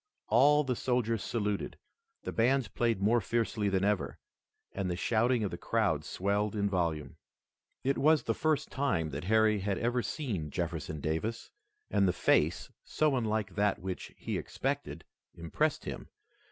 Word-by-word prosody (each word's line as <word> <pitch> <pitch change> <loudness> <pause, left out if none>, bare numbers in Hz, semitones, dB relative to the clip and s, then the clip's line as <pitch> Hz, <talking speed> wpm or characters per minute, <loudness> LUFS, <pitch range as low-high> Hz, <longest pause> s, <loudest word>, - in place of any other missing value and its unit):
All 145 +6 +5
the 130 -3 -1
soldiers 115 -3 0
saluted, 105 -3 -2 0.5
the - - -3
bands 130 +2 +2
played 115 -5 0
more 115 +3 +4
fiercely 115 -2 0
than 95 0 +1
ever, 105 -1 0 0.5
and 95 -2 -3
the 90 - -1
shouting 115 +5 +2
of 100 - -1
the - - -6
crowd - - +1
swelled 100 +2 -1
in 100 -1 +1
volume. 85 -7 -1 0.7
It 135 +1 +1
was 155 +1 +4
the - - 0
first 155 -2 0
time 95 - 0
that 70 +4 -5
Harry 110 +1 +4
had 100 0 -1
ever 120 +1 0
seen 105 - -3
Jefferson 75 +1 -3
Davis, 80 +11 -3 0.4
and 100 - +3
the 90 - +2
face, 85 -1 +2
so 155 -3 +1
unlike 110 -5 -1
that 105 -1 +1
which 95 0 -6
he - - -3
expected, - - -3 0.3
impressed 85 -2 -1
him. - - -6
105 Hz, 155 wpm, -31 LUFS, 95-120 Hz, 0.7 s, All